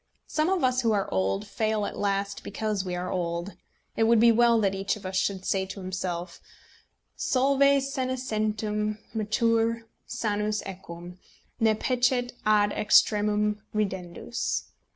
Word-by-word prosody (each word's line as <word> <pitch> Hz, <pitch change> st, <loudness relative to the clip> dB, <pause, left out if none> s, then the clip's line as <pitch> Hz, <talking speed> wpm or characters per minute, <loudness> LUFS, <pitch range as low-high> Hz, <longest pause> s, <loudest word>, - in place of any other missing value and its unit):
Some 310 Hz, +2 st, 0 dB
of 375 Hz, -5 st, +1 dB
us 255 Hz, 0 st, +2 dB
who 225 Hz, -3 st, +2 dB
are 200 Hz, -2 st, 0 dB
old 95 Hz, +2 st, 0 dB
fail 215 Hz, -1 st, -1 dB
at -, -, -5 dB
last 200 Hz, 0 st, -1 dB
because 210 Hz, -1 st, -2 dB
we 180 Hz, -2 st, -3 dB
are 180 Hz, +1 st, -3 dB
old. 170 Hz, +1 st, -2 dB, 0.4 s
It 225 Hz, -, +2 dB
would 230 Hz, 0 st, +5 dB
be 235 Hz, +1 st, +7 dB
well 235 Hz, 0 st, +4 dB
that 195 Hz, -2 st, +2 dB
each 195 Hz, +1 st, -1 dB
of 210 Hz, -, -12 dB
us 185 Hz, 0 st, -4 dB
should 190 Hz, 0 st, 0 dB
say 190 Hz, -1 st, 0 dB
to 195 Hz, +1 st, -7 dB
himself, 180 Hz, -2 st, -4 dB, 0.7 s
"Solve 270 Hz, +1 st, +1 dB
senescentem 225 Hz, -6 st, 0 dB, 0.2 s
mature 230 Hz, +1 st, +1 dB, 0.2 s
sanus 210 Hz, -1 st, -1 dB
equum, 180 Hz, -2 st, -9 dB, 0.4 s
ne 220 Hz, -2 st, +3 dB
Peccet 250 Hz, +1 st, +1 dB
ad 205 Hz, -1 st, +4 dB
extremum 210 Hz, 0 st, +3 dB
ridendus." 190 Hz, +2 st, -2 dB
210 Hz, 140 wpm, -27 LUFS, 190-230 Hz, 0.7 s, be